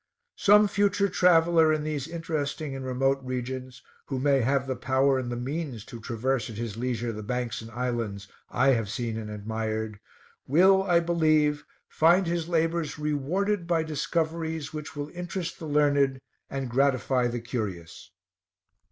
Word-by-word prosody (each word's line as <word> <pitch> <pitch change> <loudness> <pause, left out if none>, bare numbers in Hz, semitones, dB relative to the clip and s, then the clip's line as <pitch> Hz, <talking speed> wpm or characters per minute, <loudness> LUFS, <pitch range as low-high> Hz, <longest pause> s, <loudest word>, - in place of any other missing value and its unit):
Some 210 +1 +6
future 200 0 +2
traveler 165 -3 +4
in 155 -1 0
these 150 -2 -3
interesting 155 -4 -3
and 135 - -5
remote 135 +1 +1
regions, 130 0 -5 0.2
who 135 - -3
may 135 0 +3
have 135 +3 +1
the 130 -1 -2
power 130 +1 +2
and 120 -1 -4
the - - -2
means 130 -2 -4
to 120 - -9
traverse 120 +1 -1
at 110 - -8
his 115 -2 -4
leisure 120 -1 -2
the 110 - -6
banks 125 +2 -3
and 115 - -9
islands 115 -5 -3 0.2
I 135 +2 +2
have 115 -6 +2
seen 115 +1 -3
and 110 -1 -5
admired, 110 0 -3 0.5
will, 190 +7 +5
I 175 -3 +3
believe, 155 -3 +2 0.2
find 175 +4 +4
his 170 -1 -2
labors 165 -1 0
rewarded 170 +6 -1
by 165 -2 +2
discoveries 160 0 -2
which 150 -1 -7
will 145 0 -4
interest 180 -1 -5
the 160 - -6
learned, 145 -2 +2 0.3
and 135 -1 -3
gratify 130 0 +2
the 120 0 -3
curious. 100 -9 -5
135 Hz, 155 wpm, -27 LUFS, 120-160 Hz, 0.5 s, Some